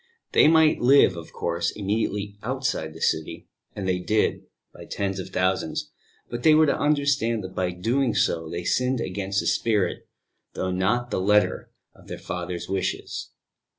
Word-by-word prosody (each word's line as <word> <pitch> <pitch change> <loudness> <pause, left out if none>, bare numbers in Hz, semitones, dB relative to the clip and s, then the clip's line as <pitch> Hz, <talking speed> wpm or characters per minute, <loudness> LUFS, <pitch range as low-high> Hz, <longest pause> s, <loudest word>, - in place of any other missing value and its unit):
They - - +6
might 160 -1 +5
live, 130 -6 +5
of 85 -2 -9
course, 85 0 -1
immediately 105 0 -2
outside 125 - -2
the 80 - -11
city - - -1 0.3
(and 100 -2 -4
they 90 -1 +1
did, 105 +4 0 0.3
by - - -11
tens 95 -1 -3
of 95 - -6
thousands), 95 -3 -1 0.4
but 120 0 -5
they 155 +3 +6
were 155 0 +6
to 145 - +2
understand 140 -7 +1
that 95 0 -8
by 90 -1 -1
doing 115 +8 0
so 80 -1 0
they 85 +1 -4
sinned 125 +6 +1
against 100 -1 -2
the - - -7
spirit, 105 -5 0 0.5
though 95 - -2
not 105 +7 0
the - - -1
letter, 105 +2 +2 0.2
of - - -20
their - - -6
Father's 90 0 -5
wishes. 95 0 -3
100 Hz, 165 wpm, -25 LUFS, 90-120 Hz, 0.5 s, They